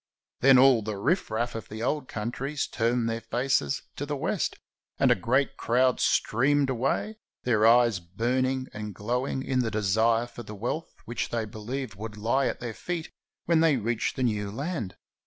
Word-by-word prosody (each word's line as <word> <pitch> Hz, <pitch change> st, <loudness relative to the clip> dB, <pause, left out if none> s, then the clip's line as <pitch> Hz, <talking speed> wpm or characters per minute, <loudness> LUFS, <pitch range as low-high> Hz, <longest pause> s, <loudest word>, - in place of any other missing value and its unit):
Then 135 Hz, 0 st, +7 dB
all 130 Hz, -2 st, +6 dB
the 105 Hz, -1 st, -4 dB
riff 160 Hz, -, +1 dB
raff 115 Hz, +2 st, -1 dB
of 110 Hz, -4 st, -7 dB
the 110 Hz, +1 st, -5 dB
old 145 Hz, +2 st, -1 dB
countries 130 Hz, +7 st, -3 dB
turned 120 Hz, 0 st, 0 dB
their 115 Hz, 0 st, -2 dB
faces 120 Hz, -, 0 dB
to -, -, -3 dB
the -, -, -2 dB
west, -, -, -1 dB, 0.4 s
and -, -, +4 dB
a -, -, +6 dB
great 130 Hz, +8 st, +1 dB
crowd 125 Hz, +2 st, +2 dB
streamed 140 Hz, +4 st, +2 dB
away, 135 Hz, -, -1 dB, 0.3 s
their 110 Hz, -3 st, +3 dB
eyes 120 Hz, -3 st, +5 dB
burning 130 Hz, +9 st, -1 dB
and 105 Hz, -2 st, -6 dB
glowing 125 Hz, +6 st, -2 dB
in 130 Hz, -1 st, 0 dB
the 120 Hz, -3 st, +1 dB
desire 110 Hz, +3 st, +2 dB
for 120 Hz, -, -10 dB
the 105 Hz, -2 st, -9 dB
wealth 120 Hz, +10 st, -3 dB
which 120 Hz, -, -3 dB
they 115 Hz, -2 st, -1 dB
be 110 Hz, +1 st, -10 dB
lieved 125 Hz, +2 st, -4 dB
would 105 Hz, 0 st, -7 dB
lie 120 Hz, +6 st, +1 dB
at -, -, -3 dB
their 120 Hz, -2 st, -5 dB
feet 170 Hz, +6 st, -5 dB, 0.3 s
when 165 Hz, -1 st, +3 dB
they 160 Hz, -4 st, +4 dB
reached 115 Hz, 0 st, -1 dB
the 130 Hz, -, -1 dB
new 105 Hz, -4 st, 0 dB
land. 130 Hz, -, -4 dB
120 Hz, 185 wpm, -27 LUFS, 110-135 Hz, 0.4 s, Then